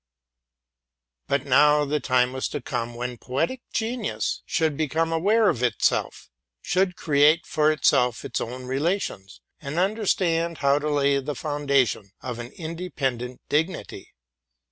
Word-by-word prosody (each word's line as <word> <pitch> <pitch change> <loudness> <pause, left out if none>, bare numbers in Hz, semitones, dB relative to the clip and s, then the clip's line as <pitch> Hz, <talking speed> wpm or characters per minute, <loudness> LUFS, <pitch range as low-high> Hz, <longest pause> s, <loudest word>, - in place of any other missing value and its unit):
But 140 -1 0
now 150 +2 +5
the 150 +1 0
time 125 -2 +2
was 130 - -2
to - - -4
come 120 -2 -4
for 125 0 -4
poetic 160 - -2
genius 225 0 -2
to 160 -2 +3
become 160 +2 -1
self 165 0 -1 0.4
conscious, 125 - 0 0.4
to 185 +1 +3
create 150 +2 +3
for 155 0 +2
itself 125 -5 +2
its - - -3
own 125 +2 -6
circumstances, 135 - -2 0.2
and 140 +2 -6
understand 175 -4 +1
how 140 +1 +3
to 150 +1 -2
lay 140 -1 +2
the 140 +2 -4
foundation 140 -9 0
of 125 -2 -5
an 120 +1 -7
independent 150 -8 -4
dig 155 +3 +2
nity. 185 - -9
145 Hz, 135 wpm, -25 LUFS, 125-165 Hz, 0.4 s, now